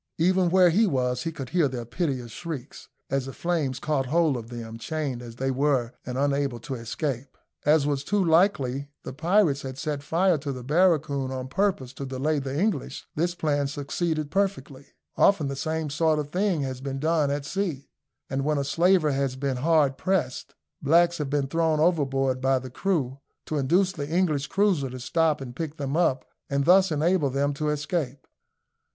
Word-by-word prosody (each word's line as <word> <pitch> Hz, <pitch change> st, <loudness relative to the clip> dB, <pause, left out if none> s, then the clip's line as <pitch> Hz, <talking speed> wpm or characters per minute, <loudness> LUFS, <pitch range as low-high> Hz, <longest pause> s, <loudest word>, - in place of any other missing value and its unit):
Even 185 Hz, +2 st, +3 dB
where 180 Hz, -1 st, +5 dB
he 215 Hz, +6 st, +4 dB
was 125 Hz, -5 st, 0 dB
he 165 Hz, -, -1 dB
could 135 Hz, -5 st, -7 dB
hear 175 Hz, -5 st, +3 dB
their 125 Hz, -3 st, -5 dB
piteous 125 Hz, -3 st, -3 dB
shrieks, 155 Hz, -4 st, -7 dB, 0.2 s
as 135 Hz, -1 st, 0 dB
the 135 Hz, -, -6 dB
flames 160 Hz, -7 st, -1 dB
caught 145 Hz, -4 st, -1 dB
hold 160 Hz, 0 st, +2 dB
of 115 Hz, -2 st, -6 dB
them, 115 Hz, -2 st, -7 dB
chained 145 Hz, -3 st, -3 dB
as 120 Hz, -1 st, -9 dB
they 135 Hz, +2 st, -1 dB
were 130 Hz, -3 st, +1 dB
and 125 Hz, 0 st, -3 dB
unable 140 Hz, -3 st, 0 dB
to 135 Hz, -, -5 dB
escape. 130 Hz, +2 st, -4 dB, 0.3 s
As 150 Hz, -1 st, +5 dB
was 140 Hz, -2 st, 0 dB
too 200 Hz, +3 st, +1 dB
likely 145 Hz, -6 st, +2 dB
the -, -, -6 dB
pirates 165 Hz, -1 st, +2 dB
had 130 Hz, -1 st, -6 dB
set 145 Hz, +1 st, -3 dB
fire 170 Hz, +3 st, +2 dB
to 140 Hz, 0 st, -4 dB
the 130 Hz, -2 st, -6 dB
barracoon 150 Hz, -3 st, +2 dB
on 130 Hz, 0 st, -5 dB
purpose 160 Hz, -7 st, 0 dB
to 140 Hz, -, -6 dB
delay 140 Hz, +4 st, 0 dB
the 135 Hz, +1 st, -3 dB
English; 195 Hz, -8 st, -1 dB
this 175 Hz, +3 st, -1 dB
plan 145 Hz, -4 st, 0 dB
succeeded 150 Hz, +2 st, -2 dB
perfectly. 145 Hz, -9 st, -2 dB, 0.3 s
Often 160 Hz, -8 st, +4 dB
the 140 Hz, -, -3 dB
same 155 Hz, +1 st, -2 dB
sort 155 Hz, +1 st, +2 dB
of 150 Hz, -1 st, -3 dB
thing 185 Hz, -3 st, +1 dB
has 130 Hz, -1 st, -4 dB
been 135 Hz, 0 st, -4 dB
done 155 Hz, 0 st, +1 dB
at 140 Hz, 0 st, -2 dB
sea, 170 Hz, -6 st, -3 dB, 0.4 s
and 135 Hz, 0 st, -2 dB
when 150 Hz, +1 st, +1 dB
a 140 Hz, -, 0 dB
slaver 170 Hz, +2 st, +3 dB
has 135 Hz, -1 st, -1 dB
been 135 Hz, -1 st, -2 dB
hard 145 Hz, -1 st, +2 dB
pressed, 185 Hz, -9 st, -1 dB, 0.3 s
blacks 170 Hz, +4 st, +4 dB
have 145 Hz, -2 st, -2 dB
been 145 Hz, -1 st, +1 dB
thrown 160 Hz, +2 st, +1 dB
overboard 135 Hz, -6 st, +1 dB
by 135 Hz, 0 st, +3 dB
the 130 Hz, 0 st, -7 dB
crew, 140 Hz, -6 st, -1 dB, 0.3 s
to 155 Hz, -, -2 dB
induce 180 Hz, +8 st, +2 dB
the 145 Hz, -5 st, -5 dB
English 155 Hz, -4 st, +1 dB
cruiser 190 Hz, -9 st, +1 dB
to 130 Hz, +1 st, -7 dB
stop 160 Hz, +3 st, +1 dB
and 125 Hz, -2 st, -7 dB
pick 160 Hz, +1 st, -5 dB
them 140 Hz, 0 st, -3 dB
up, 150 Hz, -7 st, +2 dB, 0.2 s
and 140 Hz, 0 st, 0 dB
thus 185 Hz, +1 st, +5 dB
enable 155 Hz, 0 st, +2 dB
them 140 Hz, +2 st, 0 dB
to 150 Hz, +2 st, -2 dB
escape. 150 Hz, -3 st, -2 dB
145 Hz, 190 wpm, -26 LUFS, 135-165 Hz, 0.4 s, where